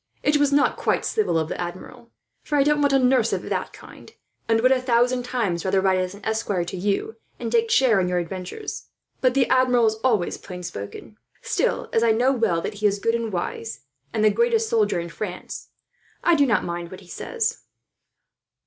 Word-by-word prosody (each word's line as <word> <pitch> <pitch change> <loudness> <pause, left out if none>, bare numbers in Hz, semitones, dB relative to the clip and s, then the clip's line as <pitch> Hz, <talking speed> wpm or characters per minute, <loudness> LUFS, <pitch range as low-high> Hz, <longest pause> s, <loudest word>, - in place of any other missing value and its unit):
It 295 0 +3
was 290 -1 +2
not 285 0 +3
quite - - 0
civil 430 - +1
of 160 -1 0
the - - -4
Admiral; 185 +7 -8 0.3
for 295 - -1
I 280 - +5
don't 295 +1 +2
want 285 -1 +3
a 275 - +5
nurse 260 0 +3
of - - -2
that - - -3
kind, - - -14 0.4
and 225 0 +4
would 255 +3 +4
a 260 -1 +3
thousand 250 0 +2
times 200 -10 -1
rather 190 0 +2
ride 190 -1 +2
as 185 +1 -3
an 200 - -13
esquire 220 -5 -1
to 180 - -6
you, 205 - -2 0.2
and - - -4
take 460 -1 +2
share 255 - +4
in 180 -1 0
your 180 - 0
adventures. 185 - -5 0.3
But 255 -1 +2
the 265 -3 +3
Admiral 250 -2 +4
is 220 0 +1
always 220 -9 +1
plain 180 -1 -9
spoken; 135 - -8 0.3
still, - - 0
as 225 - +3
I 230 -1 +4
know 245 +4 +3
well 225 -10 +1
that - - -4
he 210 - +5
is 200 0 0
good 230 +3 0
and 230 -1 -2
wise, 200 +5 -4 0.3
and 215 - +1
the 215 - +6
greatest 465 -1 +2
soldier 440 - +2
in 170 0 -5
France, 180 +2 -6 0.6
I 345 - +4
do 285 -4 +4
not 230 - +2
mind 170 0 -4
what 185 +2 -10
he 185 - -17
says." 460 - -3
225 Hz, 210 wpm, -23 LUFS, 185-270 Hz, 0.6 s, the